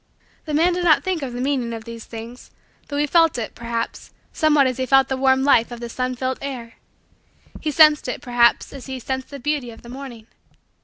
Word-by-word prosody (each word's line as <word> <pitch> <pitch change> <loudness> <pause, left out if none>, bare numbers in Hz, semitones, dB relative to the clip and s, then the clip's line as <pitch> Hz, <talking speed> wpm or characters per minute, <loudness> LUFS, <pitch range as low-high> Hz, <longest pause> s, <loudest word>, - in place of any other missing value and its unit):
The 305 -2 -2
man 340 +4 +3
did 355 0 -2
not 330 -3 +4
think 370 -4 -2
of 265 -3 -4
the 245 - -5
meaning 255 -3 -1
of 225 -1 -6
these 230 -1 -9
things; 230 +2 -10 0.4
though 285 - -4
he 295 - +2
felt 330 -1 +3
it, 230 - -4
perhaps, 230 0 -5 0.2
somewhat 300 -3 +3
as 255 0 -1
he 260 - -1
felt 270 0 +4
the 265 - 0
warm 265 0 +3
life 255 -5 +4
of 240 -1 -8
the 235 0 -6
sun 255 +1 -2
filled 260 +1 -3
air: 250 -5 -7 0.8
he 310 - -2
sensed 305 0 +5
it, - - -3
perhaps, 240 -3 +2
as 275 -1 -9
he 265 -1 -5
sensed 260 +1 -4
the 280 - -8
beauty 290 -2 -2
of 225 - -13
the 235 - -12
morning. 250 -4 -9
260 Hz, 220 wpm, -21 LUFS, 240-290 Hz, 0.8 s, sensed